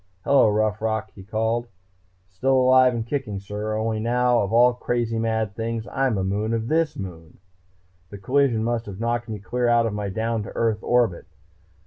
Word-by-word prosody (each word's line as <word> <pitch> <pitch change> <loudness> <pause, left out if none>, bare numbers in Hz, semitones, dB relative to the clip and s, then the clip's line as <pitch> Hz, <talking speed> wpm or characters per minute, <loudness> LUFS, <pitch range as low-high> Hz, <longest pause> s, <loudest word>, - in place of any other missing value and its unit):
"Hello, 140 -5 +4
Rough 105 0 0
Rock," 110 -1 -2
he 100 - -12
called. 110 +4 -1 0.6
"Still 110 +9 0
alive 130 -1 +5
and 115 -1 -3
kicking, 125 -6 -3
sir. 105 +2 -4
Only 110 0 -1
now, 120 +2 +2
of 100 - -1
all 120 +2 +5
crazy 120 -2 -2
mad 110 -2 -1
things, 115 0 -3
I'm 135 -5 0
a 95 - -1
moon 105 +4 -1
of 115 0 -3
this 160 -1 +1
moon! 85 -6 -9 0.7
The 100 - -9
collision 125 +2 +1
must 120 -1 -2
have 100 -1 -8
knocked 120 +1 -2
me 110 - -4
clear 120 +4 -2
out 120 -1 +4
of 110 - -2
my 105 -1 -3
down 110 +3 -2
to 105 - -7
Earth 115 -2 +1
orbit.... 120 -8 +1
115 Hz, 185 wpm, -23 LUFS, 105-120 Hz, 0.7 s, alive